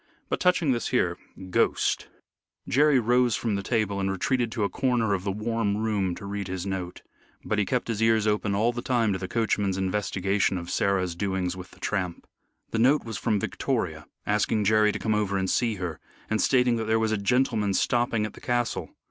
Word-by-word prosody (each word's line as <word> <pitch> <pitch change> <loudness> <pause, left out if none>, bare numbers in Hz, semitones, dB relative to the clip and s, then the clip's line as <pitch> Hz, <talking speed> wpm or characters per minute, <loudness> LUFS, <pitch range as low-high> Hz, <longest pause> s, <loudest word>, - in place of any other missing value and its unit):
But - - -1
touching 180 -5 +3
this 120 -2 -1
here 90 -9 +1 0.4
ghost - - +1 0.3
" - - -44
Jerry 145 0 +4
rose 120 0 +3
from 115 -3 -1
the 100 - -1
table 100 -2 0
and 95 0 0
retreated 120 +5 0
to 110 - -1
a - - +3
corner 115 0 +1
of 95 -2 -1
the 100 - -1
warm 105 0 -1
room 105 -5 0
to - - -9
read 100 -1 -4
his 95 0 -4
note. 95 -2 -4 0.4
But 105 - 0
he 105 - +2
kept 125 +3 -1
his 115 -2 -2
ears 115 -1 +3
open 105 -1 +1
all 115 +4 +2
the 120 - -4
time 115 -5 +1
to 95 - -3
the 95 - -4
coachman's 105 -3 0
investigation 95 0 0
of 85 0 -6
Sarah's 95 -3 +1
doings 95 -1 -1
with 90 0 -9
the - - -19
tramp. 90 -5 -3 0.5
The 115 - -1
note 130 +5 +4
was 110 -4 -5
from 105 -3 +1
Victoria - - -2 0.2
asking 105 +1 +1
Jerry 105 +1 +4
to - - -4
come 110 - 0
over 105 -2 0
and 95 0 0
see 115 +2 +1
her, 90 -5 -5 0.3
and 110 - +2
stating 125 -2 +3
that 110 - -2
there 110 +1 +2
was 110 -1 +1
a - - +2
gentleman 105 -2 +1
stopping 120 -2 +1
at 110 - -6
the - - -14
castle. 120 -1 -1
105 Hz, 210 wpm, -26 LUFS, 95-115 Hz, 0.5 s, Jerry